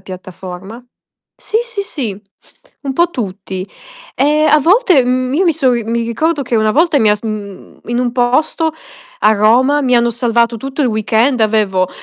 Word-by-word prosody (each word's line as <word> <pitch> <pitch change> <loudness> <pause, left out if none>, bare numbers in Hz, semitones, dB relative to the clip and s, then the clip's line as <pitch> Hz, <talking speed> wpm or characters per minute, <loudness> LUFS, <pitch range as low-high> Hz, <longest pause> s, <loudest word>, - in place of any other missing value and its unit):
piattaforma. 185 +2 -9 0.6
Sì, 435 - -1
sì, 475 -4 -4
sì, 235 - -5 0.6
un 275 -2 -3
po' 345 +4 +2
tutti. 190 - -5 0.5
E 300 +2 +2
a 305 - +5
volte, 355 - +3
mhmm, 255 +1 -1
io 360 +6 +2
mi 340 - +3
so' 275 -5 +1
ri 240 -1 -1
mi 230 +1 -1
ricordo 290 +7 -1
che 245 -2 -1
una 215 -1 +2
volta 315 +2 +3
mi 220 -4 +3
ha - - +4
s 210 - -16
mhmm, 210 -3 -7
in 240 +1 -2
un 250 -1 0
posto 280 +6 0 0.5
a - - +4
Roma 245 +7 +3
mi 250 -2 +2
hanno 235 0 +2
salvato 235 0 0
tutto 270 +5 -6
il - - +2
weekend 225 +3 +1
avevo 205 -4 +1
240 Hz, 180 wpm, -15 LUFS, 215-290 Hz, 0.6 s, a